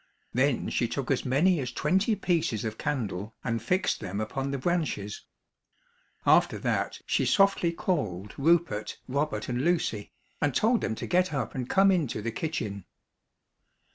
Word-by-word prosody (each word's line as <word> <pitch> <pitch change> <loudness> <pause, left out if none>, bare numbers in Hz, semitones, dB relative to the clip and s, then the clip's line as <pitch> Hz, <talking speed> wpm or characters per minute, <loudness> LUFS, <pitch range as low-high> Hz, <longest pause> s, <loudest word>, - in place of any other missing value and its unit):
Then 130 +1 +1
she 120 - 0
took 135 +3 -3
as 135 - 0
many 160 +7 +3
as 125 -3 -3
twenty 190 - +1
pieces 165 - 0
of 110 0 -4
candle 110 -8 -3
and 115 -2 -1
fixed 180 - +1
them 100 -1 -4
upon 135 +5 -2
the 140 - -2
branches. 135 - -2 1.0
After - - +4
that - - -1
she - - +1
softly 195 -4 +3
called 105 - -2
Rupert, 160 -8 +1
Robert 140 +4 -1
and 125 -1 -1
Lucy, 145 -10 0 0.3
and 145 -3 +1
told 230 +2 +3
them 110 - -1
to - - -5
get 185 +1 +2
up 135 - -2
and 125 -2 -4
come 195 0 +5
into 160 - 0
the 115 +2 -3
kitchen. 110 - -4
135 Hz, 155 wpm, -28 LUFS, 110-170 Hz, 1.0 s, come